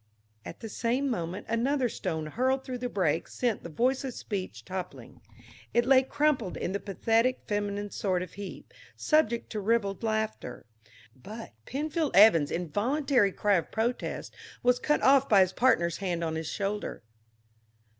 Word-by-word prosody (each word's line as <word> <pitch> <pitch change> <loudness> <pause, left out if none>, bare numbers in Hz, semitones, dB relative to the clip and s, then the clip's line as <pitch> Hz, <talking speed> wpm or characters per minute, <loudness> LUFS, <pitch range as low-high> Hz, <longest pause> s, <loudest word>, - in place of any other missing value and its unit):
At - - -9
the 225 - -5
same 245 +5 -1
moment 175 -2 -4
another 250 +3 +1
stone 160 -8 -3
hurled 260 - 0
through 255 -2 -5
the 245 0 -3
break 170 -6 0
sent 240 -4 -1
the 170 - -8
Voiceless 255 - 0
Speech 195 -4 -5
toppling; 185 -1 -7 0.5
it 240 0 +4
lay 260 0 +6
crumpled 265 -6 0
in 185 - -3
a - - -1
pathetic 225 +6 +1
feminine 205 -1 -2
sort 185 -3 -1
of 180 - -10
heap, 200 -1 -9 0.2
subject 240 -7 +1
to 215 - -3
ribald 200 -1 0
laughter, 220 - -3 0.5
but 215 - -9 0.2
Penny 295 +4 -3 0.2
Evans' 180 -8 +7
involuntary 230 - +1
cry 205 +1 +2
of 170 - -3
protest 235 +3 -2 0.3
was 245 0 +3
cut 300 - +1
off 275 0 +5
by 200 -3 +7
his 185 -1 +2
partner's 200 -10 +2
hand 175 -4 -2
on 160 -1 -1
his 160 -1 -3
shoulder. 205 - -3
220 Hz, 155 wpm, -29 LUFS, 185-250 Hz, 0.5 s, Evans